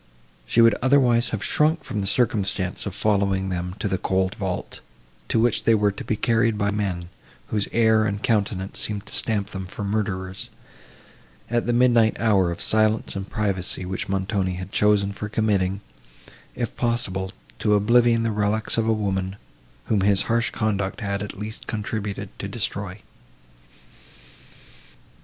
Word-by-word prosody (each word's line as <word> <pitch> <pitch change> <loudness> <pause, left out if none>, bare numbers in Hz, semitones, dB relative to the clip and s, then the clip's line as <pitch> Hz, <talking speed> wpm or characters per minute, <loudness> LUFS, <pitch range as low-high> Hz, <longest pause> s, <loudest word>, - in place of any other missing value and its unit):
She 115 - +4
would 115 -1 +7
otherwise 125 -3 +3
have 105 -2 -3
shrunk 155 +2 +2
from 105 -5 -3
the 100 - -1
circumstance 100 -5 0
of 95 - -5
following 100 -2 +1
them 90 0 -3
to - - -2
the 95 -2 -1
cold 95 0 0
vault, 95 -3 -4 0.5
to - - +1
which 115 0 +2
they 115 - +5
were 105 -1 +2
to 100 - -7
be 110 - -1
carried 115 0 +1
by 100 -1 +1
men 95 -4 -2 0.4
whose 105 -3 0
air 110 -1 +4
and 100 0 -2
countenances 100 -3 0
seemed 105 -1 -2
to - - -7
stamp 105 -3 +1
them 95 -1 -5
for 100 - -7
murderers, 100 -2 -3 1.0
at 120 0 0
the - - +2
midnight 120 -2 +4
hour 100 -6 +3
of 85 - -3
silence 110 -1 +2
and 95 0 -5
privacy, 95 -3 -2
which 95 +1 -4
Montoni 95 -1 -1
had 90 +2 -7
chosen 105 -2 +3
for 105 +1 -6
committing, 100 -3 0 0.7
if 120 - -3
possible, 100 -6 -1 0.3
to 105 -1 +3
oblivion 115 +2 +4
the 115 - 0
reliques 105 +2 +1
of 110 - 0
a 110 - +3
woman, 95 -3 -2 0.5
whom 105 -3 +1
his 100 0 +3
harsh 115 +1 +1
conduct 105 -3 -2
had, 100 -1 -2
at 105 0 -6
least, 105 +2 -6
contributed 105 -2 -4
to 100 - -4
destroy. 100 -2 -4
105 Hz, 160 wpm, -24 LUFS, 95-110 Hz, 1.0 s, would